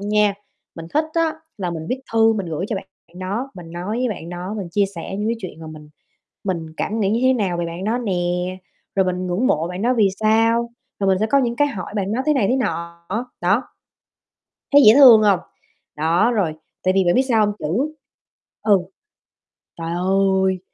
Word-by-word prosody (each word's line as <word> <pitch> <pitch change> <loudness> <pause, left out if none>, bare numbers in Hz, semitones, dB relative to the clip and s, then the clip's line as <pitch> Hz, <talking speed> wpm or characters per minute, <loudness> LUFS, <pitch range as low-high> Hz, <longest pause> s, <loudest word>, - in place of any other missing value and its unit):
nha, 210 0 +2 0.4
mình 165 -1 -8
thích 305 +1 +3
á 330 -1 +2 0.3
là 180 -3 -2
mình 160 -2 -5
viết 260 - -2
thư 225 0 +5
mình 200 -5 -3
gửi 165 +3 -3
cho 220 - -2
bạn 190 - -6 0.4
đó, 210 +9 -3
mình 170 -3 -10
nói 180 +6 -4
với 250 0 0
bạn 175 -6 -6
đó, 180 +3 -5
mình 190 -4 -5
chia 200 +3 +2
sẻ 170 +3 -6
những 210 +2 -1
cái 235 - 0
chuyện 185 -6 -8
mà 160 - -8
mình 155 -1 -11 0.6
mình 175 -5 -2
cảm 220 +1 -2
nghĩ 195 -2 +1
như 225 +3 +1
thế 260 0 +5
nào 200 -8 0
về 170 0 -2
bạn 170 +3 -6
đó 225 +4 0
nè, 230 -6 -2 0.8
rồi 190 -1 +2
mình 185 0 -2
ngưỡng 180 +8 0
mộ 160 -4 +1
bạn 180 +2 -5
đó 245 +2 +2
vì 210 -3 +4
sao, 225 +2 +2 0.3
rồi 195 - +1
mình 190 -1 +3
sẽ 215 - +1
có 280 +5 +3
những 240 -3 0
cái 290 +2 +3
hỏi 200 -8 -6
bạn 200 0 -1
đó 240 - 0
thế 305 - +3
này 225 -8 +2
thế 255 - +2
nọ, 170 -8 -3 0.4
đó. 195 +8 +2 1.1
Thấy 285 0 +8
dễ 215 - +9
thương 250 -6 +9
hông? 200 -3 +4 0.6
Đó, 165 +9 +2
rồi 190 -9 0 0.3
tại 185 0 +2
vì 190 -1 +3
bạn 175 - +3
biết 260 - +4
sao 220 -4 +4
hông? 205 - -2
Chữ 255 - -1 0.7
ừ. 205 -3 +5 1.0
Trời 165 0 -4
ơi, 190 +1 +1
200 Hz, 215 wpm, -21 LUFS, 175-230 Hz, 1.1 s, dễ